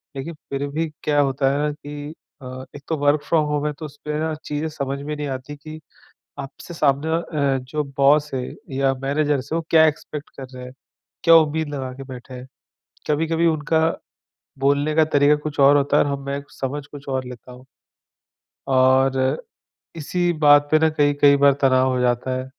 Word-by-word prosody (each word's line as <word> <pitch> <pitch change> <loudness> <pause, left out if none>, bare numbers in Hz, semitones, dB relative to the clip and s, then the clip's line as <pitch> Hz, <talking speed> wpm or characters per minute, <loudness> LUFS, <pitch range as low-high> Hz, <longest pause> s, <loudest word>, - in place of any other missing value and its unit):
लेकिन 140 +5 -5 0.2
फिर 140 +1 -2
भी 160 +3 -2 0.2
क्या 145 -1 +1
होता 135 -1 +2
है 140 - -1
ना - - -1
कि 145 +1 -8 0.3
अ, 130 0 -8
एक 145 - -9
तो 160 - 0
वर्क 145 +1 +2
फ्रॉम 155 0 +1
होम 150 0 -1
है, - - -1
तो 155 +2 -9
उसमें 150 +1 -7
ना 160 0 -1
चीज़ें 150 +2 -3
समझ 140 -2 -4
में 150 +1 -4
नहीं 150 -1 -4
आती 130 +2 -6
कि 155 +2 -10 0.6
आपसे 150 +5 -9
सामने 145 0 +1
अ, 150 -5 0
जो 145 +4 -4
बॉस 145 +2 +4
है 130 - -1 0.4
या 135 -1 +2
मैनेजर्स 145 0 -1
हैं, - - +1
वो 165 - -5
क्या 160 -1 +6
एक्सपेक्ट 150 -1 -4
कर 135 - -7
रहे 125 0 -8
हैं, 125 - -10 0.5
क्या 165 -1 +7
उम्मीद 160 -1 +3
लगा 130 -2 -4
के 135 - -9
बैठे 125 +1 -10
हैं। 125 +1 -9 0.6
कभी-कभी 165 +2 +1
उनका 160 0 +1 0.8
बोलने 140 +2 +1
का 160 0 +5
तरीक़ा 145 +1 +5
कुछ 145 -2 -3
और 140 +1 +7
होता 145 +1 +2
है - - +4
और 145 - -2
हम 140 0 -4
मैं 140 0 -3
समझ 140 +2 -5
कुछ 145 -1 -12
और 130 -1 -2
लेता 125 0 -11
हूँ। 125 +1 -14 1.0
और 130 0 +3 0.8
इसी 175 +3 -1
बात 145 0 +6
पे 155 - +5
ना 160 0 +3
कई-कई 145 -1 +4
बार 140 0 +5
तनाव 130 -1 +4
हो 125 - 0
जाता 125 +1 0
है, 130 - -4
145 Hz, 195 wpm, -22 LUFS, 135-150 Hz, 1.0 s, क्या